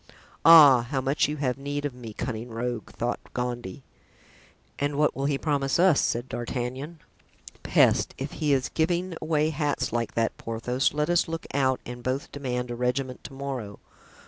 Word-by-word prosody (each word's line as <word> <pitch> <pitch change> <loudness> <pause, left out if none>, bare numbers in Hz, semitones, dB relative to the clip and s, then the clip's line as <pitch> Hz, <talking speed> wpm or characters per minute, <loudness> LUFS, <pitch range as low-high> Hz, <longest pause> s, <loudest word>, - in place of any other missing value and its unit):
"Ah! 145 -7 +8
how 135 -2 0
much 135 +3 +1
you 150 +1 -3
have 135 -2 -1
need 145 +1 -3
of 145 - -2
me, 120 -3 -9
cunning 115 +1 -5
rogue!" 115 0 -4
thought 120 +1 -3 0.2
Gondy. 120 -6 -4 1.0
("And 145 0 -1
what 150 +1 +2
will 135 - -2
he 140 -1 +1
promise 140 -2 0
us?" 175 -3 +5
said 120 +2 -1
D'Artagnan. 130 +7 -4 0.6
"Peste, - - +3
if 135 +2 -5
he 150 -2 -1
is 135 -1 +1
giving 175 +2 0
away 155 -1 +1
hats 145 -4 -1
like 115 -1 -2
that, 115 -1 0
Porthos, 120 +3 -1
let 150 +2 +1
us 175 +1 +3
look 165 0 -5
out 130 -2 +1
and 120 0 -7
both 130 +3 -3
demand 125 -3 -3
a - - -3
regiment 125 +1 -2
to 140 - -8
morrow. 130 -7 -5
135 Hz, 170 wpm, -26 LUFS, 125-150 Hz, 1.0 s, Ah